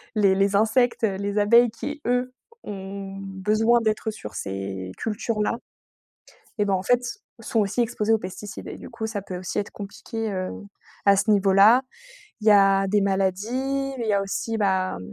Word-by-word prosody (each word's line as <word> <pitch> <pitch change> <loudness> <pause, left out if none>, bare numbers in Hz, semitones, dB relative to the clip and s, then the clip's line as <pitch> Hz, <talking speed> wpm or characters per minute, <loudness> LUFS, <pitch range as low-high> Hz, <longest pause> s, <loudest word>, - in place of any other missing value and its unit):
les 200 -2 +4
les 195 +1 +2
insectes, 225 +3 +2
heu, 200 -3 +2
les 200 +1 -3
abeilles 235 +4 +5
qui, 290 +6 -6
eux, 250 +1 0 0.3
ont 195 -1 -7
besoin 215 +5 +1
d'être 220 0 -1
sur 155 - -9
ces 95 -1 -5
cultures-là, 220 0 -1 1.0
eh 210 - +3
ben, 200 -1 +1
en 185 - 0
fait, 245 +4 +3 0.4
sont 225 0 0
aussi 210 +3 0
exposés 225 -2 0
aux 220 - +4
pesticides 195 +1 -8
et - - -6
du - - -11
coup, 225 -1 -4
ça 210 -2 -4
peut 185 -2 -6
aussi 185 +2 -4
être 205 - -2
compliqué, 215 +2 -6
heu, 185 -1 -3 0.6
à 200 - +7
ce 205 +3 +1
niveau-là. 205 +4 +6 0.6
Il 215 - -6
y - - +8
a 195 -1 +5
des 205 +2 +2
maladies, 225 +9 -1
il 230 - -3
y 210 - +1
a 200 - +2
aussi, 220 +3 -3
ben, 190 - 0
205 Hz, 180 wpm, -24 LUFS, 195-225 Hz, 1.0 s, y